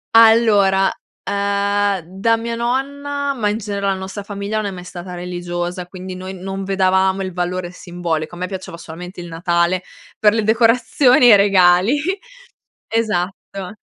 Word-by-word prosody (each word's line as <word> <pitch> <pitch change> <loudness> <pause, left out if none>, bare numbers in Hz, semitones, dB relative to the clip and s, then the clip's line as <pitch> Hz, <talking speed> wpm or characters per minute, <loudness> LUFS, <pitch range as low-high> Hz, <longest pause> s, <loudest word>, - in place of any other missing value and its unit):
Allora, 215 -4 +5 0.3
ehm, 200 -1 0
da 195 +6 +1
mia 230 +1 -4
nonna, 280 +4 -2
ma 215 -5 0
in 210 - -1
genere 200 -2 -3
la 195 - +2
nostra 190 +2 -6
famiglia 200 +1 -4
non 215 -1 -1
è - - -3
mai 180 -1 -8
stata 180 0 -8
religiosa, 175 0 -4
quindi 185 0 -8
noi 185 +1 -7
non 195 +1 -5
vedevamo 190 0 +2
il 185 -1 -5
valore 180 0 -3
simbolico. 175 -3 -4
A - - -10
me 180 - -2
piaceva 185 -2 -7
solamente 175 +3 -9
il 175 - -8
Natale 170 +2 0 0.4
per 210 -1 +5
le 225 -1 0
decorazioni 230 +3 +4
e 240 - +9
i - - +8
regali, 195 +5 +4 0.9
esatto. 195 -3 -3
195 Hz, 155 wpm, -19 LUFS, 180-215 Hz, 0.9 s, e